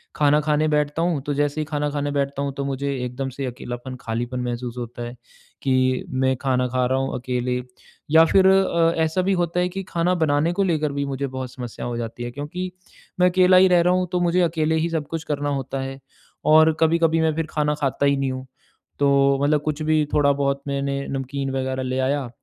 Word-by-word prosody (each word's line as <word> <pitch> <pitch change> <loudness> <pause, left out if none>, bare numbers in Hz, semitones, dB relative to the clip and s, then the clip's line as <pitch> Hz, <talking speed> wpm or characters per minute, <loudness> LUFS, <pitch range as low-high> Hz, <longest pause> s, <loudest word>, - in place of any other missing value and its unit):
खाना 150 0 +4
खाने 150 0 +1
बैठता 150 +1 0
हूँ 165 -6 0
तो 145 - -1
जैसे 145 +1 0
ही 155 - -2
खाना 150 -1 -2
खाने 145 0 -2
बैठता 140 -1 -1
हूँ, 140 - -2
तो 140 - -4
मुझे 140 +1 -2
एकदम 135 +2 -4
से 135 +1 -5
अकेलापन 125 0 -6
खालीपन 120 +2 -3
महसूस 120 0 -4
होता 120 0 -6
है, 120 +1 -7 0.5
कि 130 -1 +2
मैं 130 0 +1
खाना 125 -2 +1
खा 125 0 0
रहा 130 +1 +1
हूँ 135 - -2
अकेले। 125 0 -2 0.5
या 160 +1 +7
फिर 190 +3 +4
अ, 170 -4 +3
ऐसा 160 +4 0
भी 195 +1 +1
होता 175 +1 -1
है 180 - 0
कि 195 +2 -5
खाना 175 +2 +1
बनाने 150 +3 +2
को 200 - +1
लेकर 155 -5 0
भी 140 0 -1
मुझे 140 0 -3
बहुत 130 -1 -6
समस्या 125 -3 -7
हो 120 - -3
जाती 120 0 -5
है 120 - -5
क्योंकि 175 +7 -5 0.5
मैं 180 - +6
अकेला 185 0 +5
ही 190 +1 +7
रह 175 -1 +5
रहा 180 +1 +3
हूँ 185 0 +1
तो 180 - +2
मुझे 175 +1 +2
अकेले 160 -2 +1
ही - - -1
सब 160 -3 -2
कुछ 165 0 -4
करना 145 -1 -2
होता 135 -1 -3
है। 135 0 -6 0.5
और 160 0 +6
कभी-कभी 165 0 +3
मैं 160 -1 +2
फिर 165 -1 -2
खाना 150 -1 +1
खाता 140 +1 0
ही 140 0 +2
नहीं 135 -1 -1
हूँ। 130 0 -6 0.5
तो 140 -1 +3 0.3
मतलब 150 0 +2
कुछ 155 +1 -3
भी 155 -1 +2
थोड़ा-बहुत 140 -1 +2
मैंने 140 0 -2
नमकीन 135 0 -3
वगैरह 130 0 -2
ले 130 +1 -2
आया 135 -1 0
145 Hz, 215 wpm, -23 LUFS, 130-160 Hz, 0.5 s, या